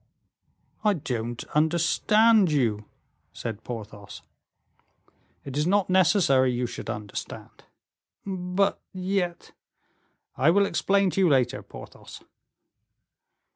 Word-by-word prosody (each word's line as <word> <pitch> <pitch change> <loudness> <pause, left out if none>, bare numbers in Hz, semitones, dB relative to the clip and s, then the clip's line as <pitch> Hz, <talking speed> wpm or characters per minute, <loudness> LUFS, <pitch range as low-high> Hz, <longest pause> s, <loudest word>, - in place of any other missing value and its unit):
"I 210 -2 +3
don't 120 -5 -4
understand 175 +6 +3
you," 115 -7 0 0.5
said 110 -2 -6
Porthos. 105 -4 -9 1.2
"It 135 -1 -7
is 150 +3 0
not 200 0 +1
necessary 170 -9 +3
you 125 0 -1
should 120 - -7
understand." 105 -2 -7 0.6
"But 190 0 -1
yet 185 -2 -3 0.4
" - - -46
"I - - +7
will 200 +4 +4
explain 195 -1 +1
to 195 - 0
you 180 - +4
later, 130 -5 +1
Porthos." - - -12
165 Hz, 100 wpm, -25 LUFS, 120-195 Hz, 1.2 s, I